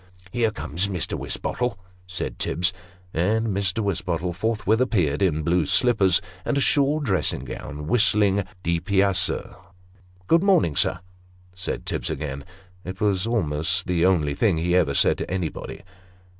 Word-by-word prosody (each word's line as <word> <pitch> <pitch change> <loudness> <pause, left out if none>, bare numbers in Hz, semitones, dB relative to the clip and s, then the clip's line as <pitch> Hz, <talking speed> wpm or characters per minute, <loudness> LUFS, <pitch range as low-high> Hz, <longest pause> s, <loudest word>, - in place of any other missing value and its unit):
" - - -27
Here 115 -2 +1
comes 80 +1 -2
Mr. 90 -4 -2
Wisbottle," 125 -4 -2 0.3
said 90 0 -5
Tibbs; 90 +1 0 0.4
and 110 +7 +1
Mr. 100 +1 -1
Wisbottle 90 -3 -2
forth 105 +3 -2
with 110 +3 +3
appeared 90 - +1
in 80 -5 +1
blue 85 -1 +1
slippers, 100 - +3 0.2
and 140 - -1
a - - +3
shawl 145 +2 +2
dressing 95 - -1
gown, 75 +1 -7
whistling 100 0 +3
" 90 -2 -30
Di 85 0 +1
piacer" 100 0 0 0.4
" 90 -1 -29
Good 165 - +4
morning, 180 - +3
sir," 85 - +1 0.5
said 90 0 -5
Tibbs - - -3
again. 70 0 -4 0.4
It 95 +1 -7
was 100 -1 +1
almost 85 -5 0
the 90 -2 +1
only 85 -6 +3
thing 95 +2 +2
he 85 +2 +1
ever 80 -6 +2
said - - +3
to - - -4
anybody. 90 -1 -4
95 Hz, 155 wpm, -24 LUFS, 85-105 Hz, 0.5 s, Good